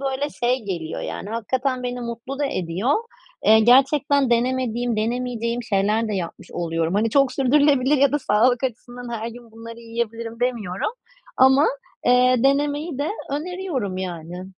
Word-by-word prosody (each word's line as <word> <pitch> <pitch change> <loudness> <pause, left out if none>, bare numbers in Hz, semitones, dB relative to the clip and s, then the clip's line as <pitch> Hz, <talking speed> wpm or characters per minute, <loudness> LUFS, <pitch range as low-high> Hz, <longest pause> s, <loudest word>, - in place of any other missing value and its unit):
böyle, 275 +1 -2
şey 245 -1 -1
geliyor 170 -5 -4
Yani, 200 - -5
hakikaten 255 +3 -1
beni 245 0 -3
mutlu 235 +3 -6
da 290 - +1
ediyor. 185 - -1 0.5
Eee, 220 +1 +7
gerçekten 270 +2 +4
denemediğim, 245 -1 0
denemeyeceğim 235 +1 -2
şeyler 215 +2 +1
de 210 - -2
yapmış 180 -1 -6
oluyorum. 165 0 -1
Hani, 220 +2 +1
"Çok 275 +1 +3
sürdürülebilir 280 0 +3
ya 280 0 +3
da 295 - +2
sağlık 245 +1 +2
açısından 245 0 -5
her 225 - -4
gün 235 -1 -12
bunları 230 +1 -10
yiyebilirim." 230 0 -5
demiyorum 225 - -1 0.5
ama, 265 +3 +5 0.4
eee, 250 +1 +5
denemeyi 290 +2 +1
de 290 +2 -1 0.2
öneriyorum 300 - -3
yani. 180 0 -6
245 Hz, 145 wpm, -22 LUFS, 220-270 Hz, 0.5 s, Eee